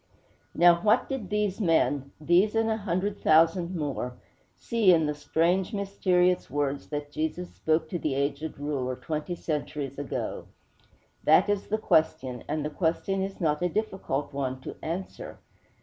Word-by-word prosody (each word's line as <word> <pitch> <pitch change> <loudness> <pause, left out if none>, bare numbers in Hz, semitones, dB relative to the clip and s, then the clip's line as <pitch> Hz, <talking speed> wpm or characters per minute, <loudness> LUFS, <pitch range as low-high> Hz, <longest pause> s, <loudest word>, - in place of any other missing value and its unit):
III - - -36
Now, 175 0 +8
what 220 +4 +3
did 260 -9 -4
these 210 0 -1
men 145 -6 +2
these 175 +8 +3
and 225 0 +2
a 220 - 0
hundred 200 0 -2
thousand 165 +3 +4
more 140 -5 -3 0.4
see 225 -5 +3
in 160 -3 +4
the 150 - 0
strange, 170 +7 0
mysterious 185 -2 +1
words 140 0 -2
that 145 -1 -5
Jesus 160 +4 -3
spoke 160 0 0
to 175 - -3
the 150 -4 -1
aged 140 +3 -2
ruler 140 -3 -2
twenty 155 +5 -4
centuries 145 -4 -4
ago? 145 - -4 0.8
That - - +5
is 205 -1 -2
the 215 - 0
question, 155 - +1
and 150 0 -2
the 150 - -3
question 185 +4 0
is 195 0 -4
not 150 -3 +1
a 180 - +1
difficult 185 -9 -2
one 130 -2 -2
to - - -7
answer. 190 - -5
165 Hz, 160 wpm, -27 LUFS, 145-190 Hz, 0.8 s, Now